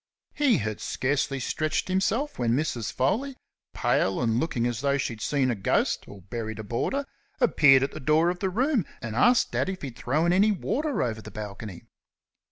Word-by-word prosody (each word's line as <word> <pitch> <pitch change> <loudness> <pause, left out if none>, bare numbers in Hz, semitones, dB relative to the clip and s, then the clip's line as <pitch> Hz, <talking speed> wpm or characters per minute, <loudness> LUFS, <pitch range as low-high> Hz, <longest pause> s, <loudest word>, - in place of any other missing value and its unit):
He 290 -5 +3
had 110 -1 -3
scarcely 135 +1 -1
stretched 155 +5 -1
himself 195 - 0
when 120 -1 +2
Mrs. 125 -6 -2
Foley, 255 - -1 0.4
pale 95 - +1
and 115 -1 +1
looking 125 -7 -1
as 120 -1 -2
though 140 0 +2
she 135 - -2
had 110 - -11
seen 135 -1 +1
a - - -1
ghost 95 - 0
or 100 -2 -12
buried 110 +2 -5
a 110 - -6
boarder, 120 - -2 0.3
appeared 145 - +5
at 135 - -1
the - - -7
door 155 +4 +3
of 180 - -7
the 190 - 0
room, 250 - +1 0.2
and 110 -3 -5
asked 245 - +4
Dad - - 0
if 190 -3 -5
he'd 130 -4 -6
thrown 155 +7 +1
any 205 +4 +4
water 285 - -1
over 110 -3 -3
the 110 - -10
balcony. 105 -2 -7
135 Hz, 190 wpm, -26 LUFS, 115-190 Hz, 0.4 s, appeared